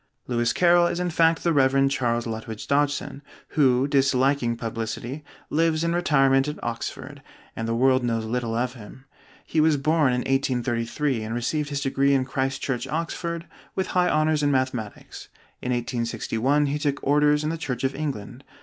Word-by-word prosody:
Lewis 120 -1 0
Carroll 175 -1 +4
is 175 - -2
in 180 -1 -1
fact 165 0 +3
the 170 - +2
Rev. 135 -1 +4
Charles 120 -4 0
Lutwidge 110 -1 -6
Dodgson, 145 -1 0 0.3
who 130 -2 +3
(disliking 135 -3 +2
publicity) 115 +5 -5 0.3
lives 160 0 +2
in 170 0 0
retirement 135 -5 +3
at 150 - -4
Oxford, 115 -1 -5 0.3
and 115 - -3
the 115 - 0
world 130 +1 +3
knows 115 -2 -1
little 115 0 -2
of 120 +1 -1
him. 125 +3 -13 0.4
He 155 - +1
was 155 -1 +4
born 150 -1 +2
in 125 0 0
1833 130 0 -1
and 110 +2 -4
received 145 +5 -1
his 140 -1 -3
degree 140 0 +2
in 130 -1 +1
Christ 135 0 -2
Church, 135 -1 -2
Oxford, 170 +2 -3 0.3
with 190 - -1
high 180 -1 +3
honors 155 0 +2
in 145 - +2
mathematics. 130 -6 -3 0.3
In 125 - -2
1861 120 +3 0
he 145 +1 -1
took 145 -1 -1
orders 150 +1 +3
in 155 - -1
the - - -2
Church 125 -5 -4
of 135 0 +1
England. 135 -4 -5
135 Hz, 170 wpm, -24 LUFS, 120-150 Hz, 0.4 s, Carroll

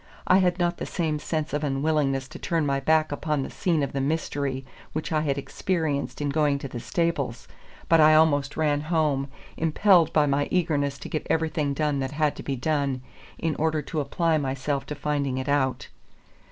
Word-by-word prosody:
I 185 - +5
had 180 -1 +2
not 175 -1 0
the - - -5
same 160 -4 -1
sense 155 -1 -3
of 150 +1 -1
unwillingness 135 -1 0
to - - -9
turn 165 -3 0
my 140 -1 +1
back 155 +2 +2
upon 145 -1 -1
the - - -6
scene 165 -6 0
of 140 - -3
the 135 - -1
mystery 140 -2 -2 0.3
which 155 +2 -3
I 155 -1 +2
had 140 -2 0
experienced 155 -1 -2
in 145 - 0
going 145 -1 +2
to 140 - -6
the 120 -2 -6
stables; 140 -1 -2 0.4
but 165 -1 +5
I 155 0 +7
almost 145 -3 +3
ran 150 -2 +1
home, 150 -4 0 0.3
impelled 165 +2 +4
by 145 -2 +2
eagerness 145 -6 0
to - - -8
get 155 - -3
everything 155 -3 0
done 150 -1 0
that 135 +1 -3
had 150 -1 +1
to - - -6
be 135 - -3
done, 140 -1 -1 0.3
in 165 -2 -1
order 155 -1 0
to 155 +2 -3
apply 160 +3 +1
myself 135 0 -2
to 150 - -4
finding 145 -2 -1
it 130 +1 -3
out. 140 -2 0
150 Hz, 195 wpm, -26 LUFS, 140-160 Hz, 0.4 s, I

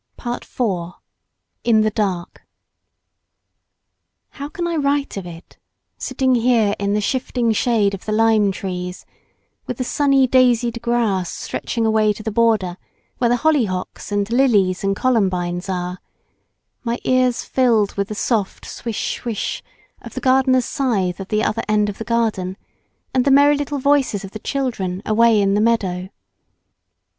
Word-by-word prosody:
PART 240 0 -4
IV.—IN 210 +2 -3
THE 215 0 +1
DARK 195 -5 -3 1.9
How 285 0 -7
can 345 +3 -4
I 340 - -1
write 285 -1 0
of 195 -3 -5
it, 170 -1 -12 0.4
sitting 260 -1 0
here 230 -4 +3
in 200 0 0
the - - +2
shifting 245 0 0
shade 215 -2 +2
of 195 - -7
the 215 - -3
lime 215 -2 +3
trees, 180 -1 -5 0.6
with 250 - -4
the 255 - -1
sunny 275 0 +3
daisied 240 -2 +3
grass 225 -7 0
stretching 230 -2 -3
away 215 -1 +3
to 215 - -10
the 220 - -2
border 210 -5 +1 0.4
where 240 - +2
the 245 - +3
hollyhocks 235 -14 -1
and 205 -1 0
lilies 210 -8 +3
and 195 0 +1
columbines 185 -6 0
are, 180 0 -3 0.8
my 235 0 -1
ears 255 -1 +2
filled 230 -6 +2
with 200 -1 -2
the 215 - -6
soft 210 -3 -1
swish 230 -3 -4
swish 230 -4 -3 0.4
of - - -11
the - - -2
gardener's 260 -1 +3
scythe 200 -10 -1
at 195 - -7
the 215 0 +1
other 225 +2 0
end 210 -1 +2
of 200 - -7
the 225 - -5
lawn, 205 -5 0 0.6
and 255 -1 +3
the 280 - +2
merry 285 +2 +6
little 290 0 -3
voices 275 -7 +1
of 195 - -8
the 215 - -7
children 210 -9 -3
away 225 0 +4
in 195 -1 +2
the 205 - +2
meadow? 190 -5 0
220 Hz, 150 wpm, -20 LUFS, 195-250 Hz, 1.9 s, merry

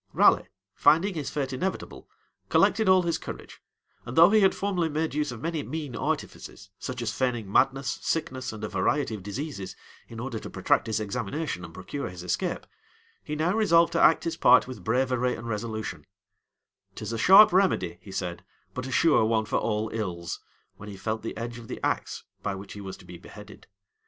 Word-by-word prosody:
Raleigh, - - +5 0.3
finding 165 +7 +4
his 150 -5 -4
fate 135 -3 -3
inevitable, 185 +9 -4 0.4
collected 220 -4 +3
all 185 -1 +6
his 170 -1 -1
courage - - -9 0.4
and 120 - -7
though 170 +4 +8
he 220 - +6
had 195 -2 +4
formerly 185 -5 -1
made 155 0 -2
use 150 -2 -1
of 120 -2 -9
many 165 -2 -1
mean 150 -4 -5
artifices, 95 -1 -4
such 125 -2 -5
as 110 -2 -2
feigning 120 -6 -1
madness, 135 +4 +2
sickness, 130 -6 -2
and 110 -1 -9
a - - -1
variety 110 +7 0
of 105 - -6
diseases, 105 - -6 0.3
in 115 - -9
order 120 -2 -4
to - - -8
protract - - +1
his 110 -1 0
examination, 110 - -3
and 80 -1 -10
procure 115 +6 -5
his 90 -1 -9
escape, 90 -1 -2 0.6
he 150 - -4
now 160 +4 +1
resolved 170 -6 +4
to - - +2
act 160 - +5
his 165 -1 -3
part 125 +1 +6
with 130 - -8
bravery 125 +1 +1
and 115 - -8
resolution, 110 -1 -4 0.9
"'Tis - - -5
a 115 - -3
sharp 195 - +8
remedy," 180 - +2
he 100 - -11
said, 90 -2 -4 0.3
"but 125 +1 -5
a - - -6
sure 160 -4 +4
one 110 -1 +1
for - - 0
all 110 0 -1
ills," 90 -6 -4 0.4
when 105 - -9
he 100 - -8
felt 110 +3 -3
the 115 - -6
edge 120 +1 -5
of 115 - -12
the - - -6
axe - - -2 0.2
by 100 -1 -2
which 95 +1 -9
he 105 - -8
was 95 -1 -7
to - - -16
be 90 -1 -11
beheaded. 105 +3 -13
125 Hz, 195 wpm, -27 LUFS, 105-155 Hz, 0.9 s, though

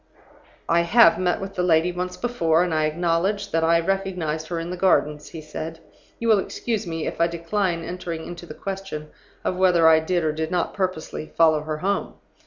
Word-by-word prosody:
"'I 170 +1 +3
have 220 +8 +5
met 180 -1 +1
with 195 0 -6
the 180 - -2
lady 170 0 +3
once 180 +1 -4
before, 170 -9 +1
and 175 -2 -1
I 155 -1 +2
acknowledge 175 +5 0
that 165 0 +1
I 165 +1 +4
recognized 170 -4 -2
her 170 0 -3
in 165 +1 -5
the - - -3
Gardens,' 150 -5 +1
he 160 - -8
said. 155 +1 -7 0.4
'You 230 - -3
will 215 -3 +5
excuse 220 +1 -3
me 165 -1 -3
if - - -3
I 170 - +5
decline 170 +1 -1
entering 170 -2 -5
into 175 0 -8
the 155 - -9
question 195 -6 -6 0.3
of 180 - -1
whether 180 -3 +4
I 160 0 +7
did 175 +2 0
or 155 - +1
did 160 +1 -3
not 175 -1 -1
purposely 180 -5 -3
follow 160 -2 +3
her 155 0 -4
home. 195 +5 -2
170 Hz, 200 wpm, -23 LUFS, 160-185 Hz, 0.4 s, I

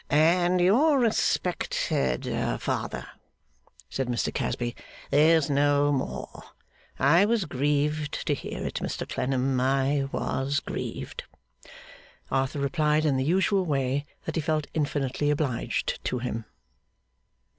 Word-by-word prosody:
'And 175 +4 +4
your 260 - +4
respected 180 - 0 0.3
father,' - - -3 0.8
said 135 -2 -3
Mr 120 -3 -1
Casby, 120 0 -2 0.4
'is 155 +1 +5
no 145 0 +3
more! 135 -2 -3 0.6
I 155 +8 +5
was 220 -3 +1
grieved 150 +2 -1
to - - +2
hear - - -5
it, - - -3
Mr - - -4
Clennam, 130 0 0
I 135 +1 +1
was 140 +2 -1
grieved.' 485 - -5 1.1
Arthur 135 +2 0
replied 150 +2 +1
in 145 -3 +2
the 130 - +1
usual 190 +5 +2
way 140 -2 -1 0.2
that - - -3
he 165 - +1
felt 155 -1 0
infinitely 145 -2 -1
obliged 145 -5 -1
to 125 - -1
him. 115 -2 -4
145 Hz, 115 wpm, -27 LUFS, 135-160 Hz, 1.1 s, is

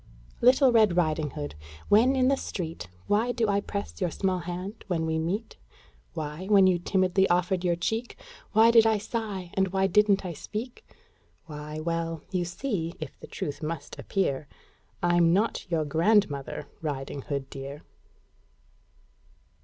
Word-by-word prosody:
Little 255 +2 +6
Red 215 -6 +4
Riding 155 -3 +1
Hood, 75 - -6 0.3
when 240 +6 +5
in 255 -1 +3
the 275 - +4
street, 165 - -5 0.2
Why 225 +4 +2
do 235 -2 0
I 200 0 +2
press 200 0 -5
your 180 - +1
small 185 +2 -1
hand 180 +4 -6
when 165 -4 0
we 160 0 0
meet? 195 +8 -3 0.6
Why, 155 +4 -5
when 200 -2 +6
you 185 -2 +3
timidly 190 +1 +2
offered 180 +1 +1
your 175 -1 +2
cheek, 220 +7 -3 0.3
Why 225 +1 +6
did 225 -1 +6
I 220 -1 +3
sigh, 205 -4 -4
and 190 0 +2
why 190 +1 +1
didn't 205 -1 +3
I 175 - -3
speak? 220 - -6 0.6
Why, 150 -1 -7
well: 165 0 -2
you 180 -2 0
see 175 -3 -3
if - - -8
the - - -10
truth 145 - -5
must 160 +1 -5
appear 150 -8 -1 0.6
I'm 175 -1 +4
not 205 -1 0
your 160 -3 0
grandmother, 160 -2 +1
Riding 140 -2 -4
Hood, 140 -1 -4
dear! 140 +2 -7
180 Hz, 155 wpm, -27 LUFS, 160-210 Hz, 0.6 s, Little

